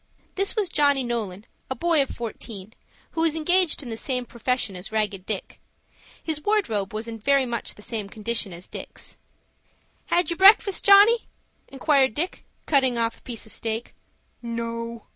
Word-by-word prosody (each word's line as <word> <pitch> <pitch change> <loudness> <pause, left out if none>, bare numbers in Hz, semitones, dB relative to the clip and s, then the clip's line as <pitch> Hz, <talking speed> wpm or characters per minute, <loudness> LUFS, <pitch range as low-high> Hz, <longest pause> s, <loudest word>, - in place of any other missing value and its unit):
This 390 +3 0
was 425 -4 +1
Johnny 285 -5 +2
Nolan, 220 -5 -4 0.2
a 260 - -2
boy 330 +3 +2
of 270 - -1
fourteen, 220 -3 -7 0.4
who 325 - -2
was 325 -1 +2
engaged 350 0 +2
in 250 - -8
the 225 - -4
same 250 0 -2
profession 235 -4 -2
as 185 +4 -8
Ragged 210 -3 -2
Dick. 210 -3 -4 0.6
His 315 -2 -2
wardrobe 235 - 0
was 215 +2 -4
in 225 -1 -6
very 275 +4 +3
much 235 -1 -3
the 210 - -10
same 215 -4 -3
condition 220 -1 -2
as 175 +1 -8
Dick's. - - -9 0.9
"Had 350 0 +1
your 340 - -2
breakfast, 395 +1 +6
Johnny?" 410 +4 +7 0.4
inquired 270 -3 +2
Dick, 345 +5 -3 0.2
cutting 265 -5 +2
off 230 0 -1
a - - -29
piece 235 -3 -7
of 220 - -5
steak. 225 +1 -3 0.5
"No." 230 -1 -5
240 Hz, 165 wpm, -24 LUFS, 220-315 Hz, 0.9 s, Johnny